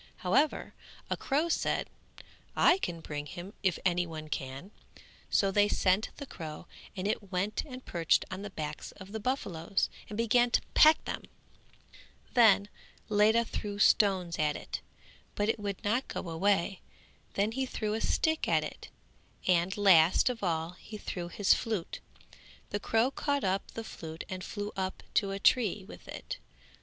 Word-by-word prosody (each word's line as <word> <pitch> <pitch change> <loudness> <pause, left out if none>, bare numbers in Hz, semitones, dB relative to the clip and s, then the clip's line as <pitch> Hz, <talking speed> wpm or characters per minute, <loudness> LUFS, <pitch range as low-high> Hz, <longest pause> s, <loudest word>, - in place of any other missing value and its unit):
However 280 +12 +2 0.4
a - - +2
crow 295 +4 0
said, 335 - 0 0.7
"I 375 - +5
can 170 - -3
bring 145 -2 -5
him 175 +6 -8
if 185 -4 +2
any 175 -1 +2
one 155 -1 -7
can," 135 +7 -5 0.6
so 195 -1 +3
they 205 +1 +4
sent 195 +1 +2
the 285 - -6
crow 155 - -8 0.3
and 185 +2 -1
it 205 -2 -2
went 195 +3 -1
and 255 -2 -9
perched 165 -2 +2
on 185 - -5
the 205 - -5
backs 155 -5 -5
of 190 0 -12
the 220 - -4
buffaloes 200 - -1 0.2
and 210 - -6
began 240 +2 +3
to - - +3
peck 310 +1 +6
them; - - -4 1.1
then 220 -5 +6 0.4
Ledha 215 +2 +4
threw 205 -2 -4
stones 190 -4 +3
at 150 -1 +2
it, - - -5 0.5
but 205 +1 0
it 225 - +1
would 200 -2 -4
not 235 +6 +1
go - - -5
away; 195 +2 +1 0.5
then 205 +2 +1
he 260 +2 -2
threw 215 -4 -2
a 220 - -2
stick 315 0 +1
at - - +3
it - - -8 0.6
and 180 +2 +2
last 185 -1 +6
of 245 -2 -4
all 165 -3 -1
he 215 - -9
threw 175 -4 -5
his 195 +3 +3
flute. 215 -7 -3 0.7
The 205 - -1
crow 225 +5 +2
caught 285 -1 -1
up 195 +1 0
the 225 - -5
flute 160 -6 -7
and 185 -1 -5
flew 205 +1 -4
up 190 -1 -3
to 200 - +2
a 195 - -2
tree 205 -2 +3
with - - -12
it. - - -6
200 Hz, 165 wpm, -31 LUFS, 175-225 Hz, 1.1 s, peck